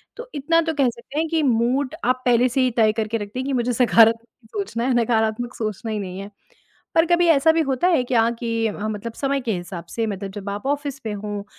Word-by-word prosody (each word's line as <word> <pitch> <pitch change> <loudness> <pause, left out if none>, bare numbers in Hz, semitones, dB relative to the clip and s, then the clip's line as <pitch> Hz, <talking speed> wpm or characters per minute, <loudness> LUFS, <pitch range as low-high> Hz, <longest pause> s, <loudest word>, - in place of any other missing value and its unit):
तो 485 +1 -9
इतना 330 +4 +2
तो 325 -1 -2
कह 275 -4 +2
सकते 250 +5 -6
हैं 325 - 0
कि 320 -1 +1
मूड 255 +3 +1
आप 255 +1 +1
पहले 245 0 +4
से 260 +2 0
ही 255 -1 +2
तय 220 -2 +5
करके 220 +1 -1
रखती 210 +3 -6
हैं 260 - -3
कि 280 - -1
मुझे 245 -1 0
सकारात्मक 230 -1 +3
सोचना 385 - -3
है 260 - +2
नकारात्मक 225 +1 0
सोचना 220 0 -4
ही 215 - -2
नहीं 185 -1 -6
है। 200 +1 -8 0.6
पर 325 - +5
कभी 345 +1 +3
ऐसा 320 0 +5
भी 325 0 +1
होता 275 +2 +1
है 330 -8 +3
क्या 235 -2 +2
कि 230 -1 -1
अ, 210 - -3
मतलब 215 +2 -5
समय 275 +3 -1
के 240 -3 -2
हिसाब 175 -1 -6
से 230 - -2
मतलब 195 -1 -5
जब 200 0 -6
आप 205 +3 -5
ऑफ़िस 285 -1 -2
पे 220 - -3
हो 205 0 -5
235 Hz, 240 wpm, -22 LUFS, 220-275 Hz, 0.6 s, तय